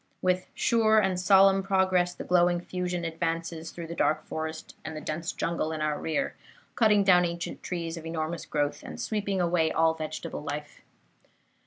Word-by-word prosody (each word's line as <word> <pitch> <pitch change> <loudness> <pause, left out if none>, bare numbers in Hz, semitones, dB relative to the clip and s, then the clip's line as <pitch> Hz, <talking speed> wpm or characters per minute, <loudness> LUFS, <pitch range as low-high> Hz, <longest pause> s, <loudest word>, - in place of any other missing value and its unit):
With 185 0 +1
sure 220 -2 +3
and 190 -4 +2
solemn 195 +1 +6
progress 190 -2 +2
the - - -6
glowing 175 -1 +3
fusion 180 -1 -3
advances 165 0 -3
through 170 - -7
the 165 - -6
dark 155 -2 +1
forest 160 0 -5
and 160 0 -6
the - - -3
dense 160 +4 -3
jungle 165 -2 -2
in 160 - -3
our 150 -1 -1
rear, 165 - -1 0.4
cutting 210 -3 +4
down 180 -2 +6
ancient 170 0 -4
trees 170 -2 -4
of 165 - -8
enormous 165 0 -3
growth 145 -1 -1
and - - -9
sweeping 205 -3 -1
away 170 -2 +2
all 160 0 +3
vegetable 155 -1 -5
life. 150 0 -6
170 Hz, 170 wpm, -28 LUFS, 160-185 Hz, 0.4 s, solemn